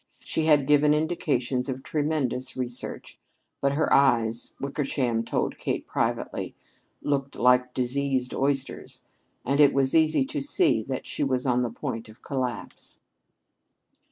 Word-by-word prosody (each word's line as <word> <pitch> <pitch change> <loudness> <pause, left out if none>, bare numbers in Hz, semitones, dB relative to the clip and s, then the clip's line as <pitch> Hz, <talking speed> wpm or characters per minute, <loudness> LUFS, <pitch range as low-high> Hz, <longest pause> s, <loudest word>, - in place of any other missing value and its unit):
She 160 - -1
had 150 -3 +4
given 150 +1 +4
indications 135 -5 0
of 130 0 -4
tremendous 145 -5 -1
research. 125 -1 -4 0.4
But 140 0 +2
her 155 +2 +1
eyes, 115 -4 +2
Wickersham 135 -4 -1
told - - -2
Kate - - -2
privately, - - -2 0.5
looked 140 -1 -1
like 125 0 +3
diseased 130 0 -1
oysters, 135 0 -2 0.4
and 140 +3 +1
it 145 -2 +6
was 135 -1 +2
easy 160 - +4
to 295 +1 -3
see 290 - +3
that 130 +3 -5
she - - -2
was 130 -2 0
on 125 -1 +2
the 120 - 0
point 115 0 -5
of 110 - -17
collapse. 130 -3 -4
135 Hz, 135 wpm, -26 LUFS, 125-145 Hz, 0.5 s, it